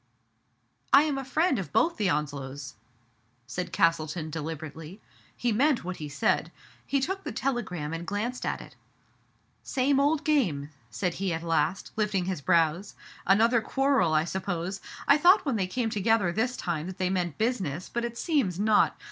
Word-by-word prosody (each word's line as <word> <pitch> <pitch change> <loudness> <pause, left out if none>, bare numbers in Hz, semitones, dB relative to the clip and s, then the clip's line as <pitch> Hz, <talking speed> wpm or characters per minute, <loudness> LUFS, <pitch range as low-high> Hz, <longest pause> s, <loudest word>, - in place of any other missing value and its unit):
*' - - -45
I 280 - +9
am 290 -3 -1
a - - -4
friend 290 - +1
of 170 -7 -6
both 335 - +2
the 205 -4 +1
Onslows," 140 -2 -3 0.7
said 180 +7 -5
Cas 165 0 +4
tleton 155 +1 -5
deliberately. 160 +3 -6 0.4
He 240 - 0
meant 265 +5 +2
what 180 +1 -5
he 150 -1 -6
said. 140 0 0 0.4
He 275 - +1
took 385 +8 -2
the - - -4
telegram 210 - -2
and 165 +1 -5
glanced 230 +5 -3
at - - -2
it. - - -13 0.9
Same 275 +1 +1
old 295 +2 +2
game! 175 - +1
" - - -35
said 180 +4 -2
he 195 -2 0
at 165 0 -3
last, 165 +3 0
lifting 210 -4 0
his 185 -5 -3
brows. 170 +3 +1 0.2
" - - -21
Another 225 +4 +4
quarrel, 265 - +2
I 155 - +4
suppose. 185 +1 -3 0.3
I 280 +2 +6
thought 365 +5 +6
when 270 -5 0
they 190 -4 0
came 230 +3 -2
together 210 -3 +2
this 245 +7 -1
time 165 -2 -3
that 185 - -7
they 185 -1 0
meant 175 -5 -1
business, 190 - -1
but 235 - -3
it 235 0 -4
seems 260 - 0
not. 215 0 +3
195 Hz, 180 wpm, -28 LUFS, 165-250 Hz, 0.9 s, I